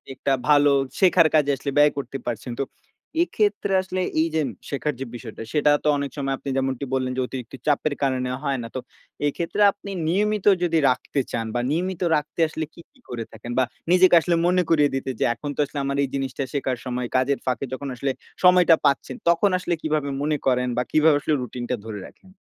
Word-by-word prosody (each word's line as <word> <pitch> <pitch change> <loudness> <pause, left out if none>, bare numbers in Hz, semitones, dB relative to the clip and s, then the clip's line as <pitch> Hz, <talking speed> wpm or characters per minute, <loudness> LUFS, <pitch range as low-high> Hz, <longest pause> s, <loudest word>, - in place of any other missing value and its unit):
একটা 135 - 0 0.2
ভালো 145 -1 +6 0.3
শেখার 180 -4 +5
কাজে 145 -2 +4
আসলে 140 +1 -4
ব্যয় 145 0 +6
করতে 135 0 -4
পারছেন। 120 0 -4
তো - - +2 0.6
এক্ষেত্রে 205 - 0
আসলে 185 0 -3 0.2
এই 165 - +2
যে 160 - +3 0.3
শেখার 145 +1 -2
যে 135 - -3
বিষয়টা, 115 -2 -8
সেটা 150 -1 +4
তো - - 0
অনেক 140 -2 -3
সময় 135 -1 -1
আপনি 140 - -7
যেমনটি 135 0 -1
বললেন 130 -1 0
যে, - - +1
অতিরিক্ত 130 0 -7
চাপের 145 0 +2
কারণে 130 -2 0
হয় 140 -2 0
না। - - -5
তো - - -1 0.5
এক্ষেত্রে 170 +7 -2
আপনি 200 0 -10 0.2
নিয়মিত 210 +3 +1 0.2
যদি 165 -2 +2
রাখতে 135 +2 -1
চান 115 -1 -2
বা - - +1
নিয়মিত 180 +2 -2
রাখতে 150 +3 -4
আসলে 155 0 -4
কী, 170 - -13
কী 270 - -27
করে 115 -2 -4
থাকেন? 115 +2 -8
বা 130 - +5 0.3
নিজেকে 180 -1 +6
আসলে 170 0 +1
মনে 180 0 +3
করিয়ে 150 -3 +4
দিতে 135 0 -3
যে, - - +1
"এখন 145 +4 -7
তো - - -12
আসলে 140 +1 -6
আমার 140 0 -1
এই - - 0
জিনিসটা 135 0 -2
শেখার 130 -3 -1
সময়।" 125 -1 -2
কাজের 130 +2 +2
ফাঁকে 130 +1 -1
যখন 140 +2 -5
আসলে 135 +2 -1 0.3
সময়টা 180 -2 +7
পাচ্ছেন, 135 -2 +1
তখন 170 +4 +4
আসলে 180 -1 -2
কিভাবে 150 -2 -1
মনে 150 0 0
করেন 125 -1 +2
বা 125 - +2
কিভাবে 155 -1 +5
আসলে 155 - 0
রুটিনটা 125 +1 -4
ধরে 105 -2 -6
রাখেন? 190 - -20
140 Hz, 205 wpm, -23 LUFS, 130-165 Hz, 0.6 s, সময়টা